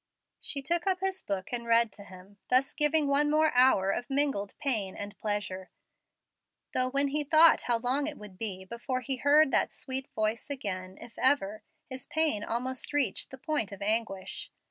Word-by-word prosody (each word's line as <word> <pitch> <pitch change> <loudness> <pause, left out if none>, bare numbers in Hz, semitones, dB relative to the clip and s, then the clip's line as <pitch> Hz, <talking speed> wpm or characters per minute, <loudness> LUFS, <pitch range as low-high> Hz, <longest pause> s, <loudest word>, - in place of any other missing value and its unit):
She 280 -2 -2
took 345 +5 0
up 375 -1 +1
his 380 0 -2
book 195 +2 -5
and 235 -1 -3
read 230 -1 +4
to 200 - -11
him, 195 +1 -15
thus 260 +2 +3
giving 300 0 +3
one 285 +1 +2
more 310 +1 +3
hour 245 -7 +4
of 240 +6 -4
mingled 270 -8 -1
pain 215 -9 -2
and 205 +1 -7
pleasure; 200 -3 -3 1.0
though 255 0 +2
when 280 +1 +1
he 300 +2 0
thought 315 +3 +6
how 240 -1 +1
long 260 +5 0
it 300 - -4
would 210 -3 -12
be 190 -4 -3
before 245 +5 -4
he 265 +1 -1
heard 290 +1 +4
that - - +2
sweet 265 0 -2
voice 220 +4 -2
again, 190 -8 -5
if 230 - -12
ever, 215 -6 +2 0.3
his 260 -1 -6
pain 310 -10 +2
almost 255 +5 -3
reached 270 -9 +1
the 265 - -10
point 290 - -2
of 200 0 -7
anguish. 210 -3 -1
250 Hz, 185 wpm, -29 LUFS, 205-285 Hz, 1.0 s, thought